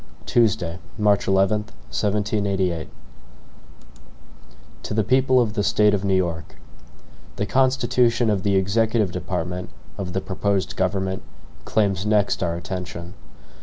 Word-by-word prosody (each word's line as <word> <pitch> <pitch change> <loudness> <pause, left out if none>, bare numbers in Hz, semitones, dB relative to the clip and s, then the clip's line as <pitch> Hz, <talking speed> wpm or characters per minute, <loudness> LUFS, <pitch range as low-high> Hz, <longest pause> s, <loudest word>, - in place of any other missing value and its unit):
Tuesday, 105 -7 +1 0.2
March 105 -2 +2
11, 95 +2 +3
1788. 100 - -1
HAMILTON 80 -1 -6 1.9
To - - -5
the 110 - +2
People 130 +2 +3
of 115 -4 +1
the 105 - 0
State 105 +1 +3
of 100 -2 0
New 95 -1 +2
York: 85 -4 -2 0.8
THE 105 - -1
constitution 120 -1 +2
of 100 -3 0
the 100 0 +1
executive 105 +1 +2
department 90 +2 -4 0.3
of 90 -2 -4
the 95 - -1
proposed 100 0 -1
government, 95 0 -1 0.4
claims 100 -3 +1
next 105 -1 +1
our 85 -2 0
attention. 85 0 -6
100 Hz, 125 wpm, -23 LUFS, 90-105 Hz, 1.9 s, 11